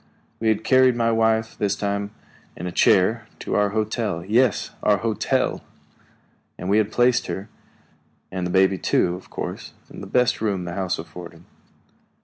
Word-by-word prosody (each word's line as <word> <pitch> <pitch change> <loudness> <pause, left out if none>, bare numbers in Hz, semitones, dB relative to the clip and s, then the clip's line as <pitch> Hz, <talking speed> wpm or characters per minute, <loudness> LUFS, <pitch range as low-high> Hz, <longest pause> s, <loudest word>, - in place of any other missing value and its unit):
We 115 - -1
had 110 0 +1
carried 130 -1 +4
my 115 -1 +1
wife, 110 0 +1
this 100 -1 0
time 100 0 -2 0.5
in 85 - -6
a 90 - -3
chair, 110 +6 +3
to - - -5
our 105 0 +2
hotel 105 -4 -2
yes, 115 +2 +2
our 105 -1 +3
hotel! 110 +1 -1 0.9
and - - -7
there - - 0
we 105 - +4
had 110 0 0
placed 120 +1 +2
her, 100 +3 -5 0.8
and 90 -1 -2
the - - -5
baby 95 +1 +3
too, 85 - +1
of 90 - -10
course, - - -6 0.2
in - - -9
the 100 - -8
best 125 +3 +1
room 100 -5 -1
the 85 - -5
house 95 -1 -2
afforded. 85 0 -10
105 Hz, 170 wpm, -23 LUFS, 95-115 Hz, 0.9 s, carried